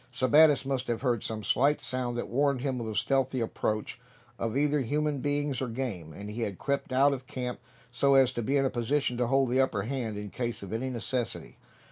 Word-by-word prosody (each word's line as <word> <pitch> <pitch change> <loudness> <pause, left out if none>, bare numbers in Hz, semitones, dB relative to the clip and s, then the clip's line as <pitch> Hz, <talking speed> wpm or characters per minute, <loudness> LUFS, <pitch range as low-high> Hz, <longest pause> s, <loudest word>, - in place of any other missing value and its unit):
Sebattis 145 +3 +5
must 135 -1 -2
have 120 +1 -2
heard 120 -5 +1
some 110 -1 -4
slight 140 +7 +2
sound 125 -1 -3
that 120 - -3
warned 140 0 +1
him 130 -2 -1
of 115 - -4
the 110 - -4
stealthy 135 +1 +1
approach 110 -2 -2 0.4
of 115 +2 -1
either 150 +1 +2
human 145 +3 0
beings 145 -1 -1
or 130 - -1
game, 115 -10 -4
and 100 +6 -8
he 115 +3 -5
had 100 -5 -2
crept 140 -1 -2
out 140 +2 +4
of 130 -1 -6
camp 125 -1 -4 0.3
so 135 +3 +3
as 135 -2 +5
to 120 - -3
be 135 +5 +1
in 135 - +2
a 130 - 0
position 125 +2 0
to 125 -1 +1
hold 135 -1 +2
the 130 +1 +4
upper 110 -7 0
hand, 115 -3 -3
in 105 -1 -6
case 120 -4 -3
of 100 - -7
any 125 +4 -2
necessity. 120 0 -3
130 Hz, 220 wpm, -29 LUFS, 115-135 Hz, 0.4 s, Sebattis